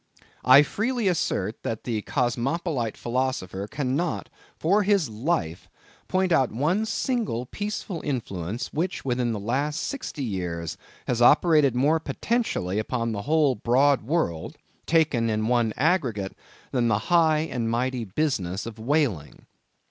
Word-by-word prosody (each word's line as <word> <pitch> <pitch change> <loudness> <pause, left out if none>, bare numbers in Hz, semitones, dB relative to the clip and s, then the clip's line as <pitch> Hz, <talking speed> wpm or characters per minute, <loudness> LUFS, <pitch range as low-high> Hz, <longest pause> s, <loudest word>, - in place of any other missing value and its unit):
I 130 +3 +8
freely 230 - -1
assert, 115 - -1
that 110 - -4
the 115 -3 -2
cosmopolite 125 - -1
philosopher 120 -6 -2
cannot, 145 +6 -2 0.3
for 195 +6 +3
his 200 - +2
life, 105 - -2 0.4
point 185 -1 +1
out 135 -7 +3
one 165 - 0
single 225 - -1
peaceful 205 - -4
influence, 115 - -4
which 175 +1 -2
within 125 -2 0
the 110 - -3
last 140 +9 -1
sixty 255 - -4
years 90 -7 -3 0.3
has 120 -1 -1
operated 150 0 +5
more 145 +6 +3
potentially 145 - -1
upon 115 +1 -2
the 100 -2 -3
whole 155 -4 +4
broad 130 +5 +3
world, 110 - -2 0.3
taken 150 -8 +2
in 110 0 0
one 120 -2 +2
aggregate, 125 - 0 0.4
than 120 -3 +1
the 110 -3 +3 0.2
high 160 -3 +5
and 120 -8 -2
mighty 125 +1 -1
business 100 - -1
of 115 -1 -8
whaling. 120 - -1
130 Hz, 135 wpm, -25 LUFS, 110-160 Hz, 0.4 s, I